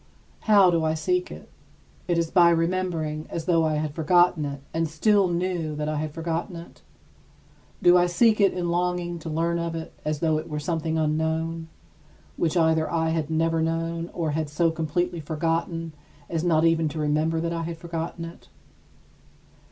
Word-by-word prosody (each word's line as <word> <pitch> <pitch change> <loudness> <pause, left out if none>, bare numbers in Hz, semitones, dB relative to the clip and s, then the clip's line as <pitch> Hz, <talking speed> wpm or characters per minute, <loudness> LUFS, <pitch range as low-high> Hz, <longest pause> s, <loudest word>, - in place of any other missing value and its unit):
How 200 -4 +7
do 165 -1 +1
I 155 0 +1
seek 360 - 0
it? - - -10 0.6
Is 170 -2 +1
it - - -23
by 175 -2 +7
remembering, 165 -3 -1
as 165 -1 -4
though 165 -2 +3
I 155 -1 +1
had 150 -1 -2
forgotten 175 0 +3
it 140 -1 -5
and 165 0 0
still 200 +5 +3
knew 175 -3 -2
that 150 0 -3
I 155 0 -1
had 155 0 -3
forgotten 165 +3 -3
it? 170 0 -11 1.0
Do 175 0 +7
I 175 - +3
seek 215 +4 +3
it 195 - +5
in 175 -1 -2
longing 175 0 -1
to 160 - -7
learn 165 +2 0
of 170 -1 -3
it 160 -1 -6
as 155 0 -1
though 155 -1 +1
it 160 - -8
were 150 - -3
something 160 +1 -2
unknown, 160 +1 -1 0.7
which 165 +1 0
either 160 -1 +2
I 160 -1 0
had 160 -2 -1
never 165 0 +1
known 165 +1 -2
or 165 -3 -2
had 155 0 -2
so 165 +3 +1
completely 170 +2 -2
forgotten 165 +1 -2 0.4
as 165 -1 -1
not 165 -2 +3
even 165 -1 +2
to 155 +2 -6
remember 155 +2 +1
that 170 +1 -2
I 165 - -2
had 165 0 -5
forgotten 165 0 -5
it? 165 - -12
165 Hz, 185 wpm, -25 LUFS, 160-170 Hz, 1.0 s, How